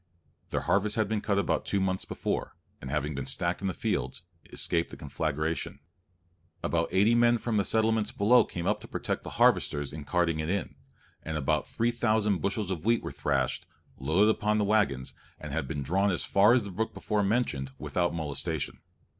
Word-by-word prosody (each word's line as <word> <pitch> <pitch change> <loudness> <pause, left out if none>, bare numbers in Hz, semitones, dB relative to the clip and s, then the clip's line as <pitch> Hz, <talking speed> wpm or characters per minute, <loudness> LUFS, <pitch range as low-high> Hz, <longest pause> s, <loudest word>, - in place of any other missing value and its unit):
Their - - -1
harvest 105 +1 +1
had 110 -2 +1
been 105 0 -1
cut 100 -2 0
about 100 - +1
two 100 - 0
months 95 -1 -1
before, - - -3 0.3
and 65 - -7
having 75 +2 -1
been 70 -1 -4
stacked 85 +2 0
in 100 - -1
the 95 - -1
fields, - - -2 0.3
escaped 85 -1 +1
the - - -10
conflagration. 80 +2 -2 0.9
About 85 0 0
eighty 105 +5 +4
men 120 0 +4
from 115 -1 -1
the 100 - +3
settlements 110 0 +1
below 115 +4 +5
came 85 -4 -6
up - - +1
to - - -10
protect - - -3
the - - -7
harvesters 75 -1 +2
in 75 -1 -6
carting 85 +1 +1
it 80 +1 -2
in, 100 +2 -2 0.5
and 80 -1 -4
about 75 +1 0
three 115 +1 0
thousand 110 -4 +1
bushels 100 -1 -1
of 90 -3 -3
wheat 115 +2 +2
were - - -4
thrashed, 70 -3 -1 0.3
loaded 85 +11 +3
upon 105 0 0
the 105 - +2
waggons, 100 -12 +1 0.3
and 75 - -7
had 75 -3 -2
been 70 -1 -3
drawn 95 +8 +2
as 90 - 0
far 100 +4 +5
as 125 -3 +3
the 100 - -7
brook 110 +5 -3
before 105 -1 0
mentioned 100 - 0
without 85 -1 -1
molestation. 75 -4 -3
95 Hz, 195 wpm, -29 LUFS, 75-105 Hz, 0.9 s, below